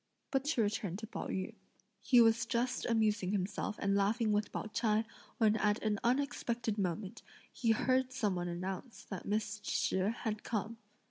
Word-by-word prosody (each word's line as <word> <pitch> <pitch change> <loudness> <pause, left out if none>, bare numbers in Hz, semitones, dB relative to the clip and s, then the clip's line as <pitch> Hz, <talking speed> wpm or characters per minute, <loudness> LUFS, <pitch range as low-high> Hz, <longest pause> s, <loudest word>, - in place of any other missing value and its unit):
But 270 0 +1
to 290 -6 +2
return 205 -3 -1
to 220 - -6
Pao 220 - -5
yü. 190 +4 -3 0.5
He 245 +2 +6
was 225 0 +4
just 245 +1 0
amusing 215 -4 +2
himself 205 +1 -1
and 200 0 +1
laughing 210 +3 +2
with 210 0 +1
Pao - - -3
ch'ai, 215 0 +1 0.3
when 220 -1 +4
at 210 -1 +2
an 210 -2 +1
unexpected 240 -4 0
moment, 190 +1 -2 0.3
he 235 - -1
heard 255 +3 +2
some 215 -6 0
one 175 -1 -2
announce 185 +7 -5
that 190 -3 -7
Miss 210 0 -1
Shih 190 -2 +1
had 215 -2 -2
come. 225 0 -2
215 Hz, 165 wpm, -34 LUFS, 200-230 Hz, 0.5 s, He